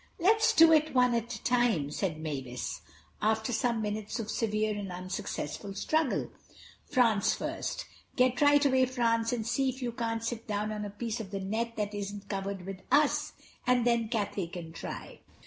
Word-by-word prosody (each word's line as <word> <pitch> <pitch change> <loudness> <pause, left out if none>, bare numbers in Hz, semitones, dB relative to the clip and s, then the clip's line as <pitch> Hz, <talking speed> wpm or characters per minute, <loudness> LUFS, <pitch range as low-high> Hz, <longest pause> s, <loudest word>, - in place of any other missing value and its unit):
"Let's 430 +6 +4
do 325 0 +8
it, 310 -2 +3
one 250 -1 +5
at 235 0 -1
a - - -10
time," 240 - +2
said 160 -1 -2
Mavis, 135 -6 -4 0.4
after 220 +3 +1
some 230 -1 +1
minutes 210 +1 -3
of 220 -1 -3
severe 215 -1 0
and 200 -2 -5
unsuccessful 185 0 -5
struggle. 310 +7 0 0.6
"France 230 -5 +3
first. - - -4 0.3
Get 250 0 +3
right 290 0 +6
away, 260 -2 +4
France, 230 -2 +1
and 235 -3 -2
see 260 +3 +1
if 260 +1 -5
you 240 - -1
can't 230 -1 -2
sit 230 0 -4
down 210 0 -1
on 210 -1 -3
a - - -4
piece 225 +3 -4
of 215 -4 -6
the 195 0 -3
net 225 +4 -2
that 210 -1 -2
isn't 205 0 -5
covered 195 -2 -3
with 190 -1 -6
us, 295 0 +3 0.3
and 250 -1 +4
then 235 -2 +2
Cathay 205 -5 -1
can 170 -1 -8
try." - - -7
220 Hz, 180 wpm, -30 LUFS, 200-245 Hz, 0.6 s, do